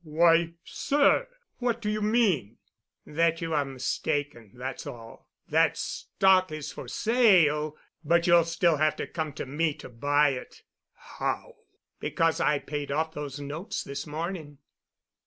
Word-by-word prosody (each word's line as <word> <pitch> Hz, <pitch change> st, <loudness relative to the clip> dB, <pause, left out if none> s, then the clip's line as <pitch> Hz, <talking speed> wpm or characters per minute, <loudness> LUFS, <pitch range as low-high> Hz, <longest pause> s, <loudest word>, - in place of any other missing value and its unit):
"Why, 165 Hz, +1 st, +3 dB
sir—what 290 Hz, -, 0 dB
do 225 Hz, -, -5 dB
you 215 Hz, 0 st, -1 dB
mean?" 205 Hz, -, +1 dB, 0.5 s
"That 165 Hz, +2 st, +1 dB
you're 160 Hz, -3 st, 0 dB
mistaken, 135 Hz, -3 st, -3 dB
that's 130 Hz, +2 st, -6 dB
all. 115 Hz, -1 st, -11 dB, 0.2 s
That -, -, +3 dB
stock 185 Hz, -2 st, +2 dB
is 155 Hz, -2 st, -5 dB
for -, -, -9 dB
sale, 175 Hz, -11 st, +3 dB, 0.3 s
but 170 Hz, +2 st, +3 dB
you'll 170 Hz, -1 st, +5 dB
still 165 Hz, -1 st, +2 dB
have 155 Hz, +1 st, +2 dB
to -, -, -4 dB
come 160 Hz, -2 st, -4 dB
to -, -, -5 dB
me 150 Hz, +3 st, -1 dB
to -, -, -11 dB
buy 145 Hz, +5 st, +2 dB
it." 130 Hz, -2 st, -7 dB, 0.3 s
"How——" -, -, -5 dB, 0.4 s
"Because 165 Hz, -1 st, 0 dB
I 150 Hz, 0 st, +3 dB
paid 145 Hz, 0 st, -5 dB
off 160 Hz, +2 st, -1 dB
those 145 Hz, -2 st, -6 dB
notes 150 Hz, +6 st, -5 dB
this 140 Hz, +2 st, -6 dB
morning. 155 Hz, -1 st, -5 dB
155 Hz, 140 wpm, -27 LUFS, 145-175 Hz, 0.5 s, you'll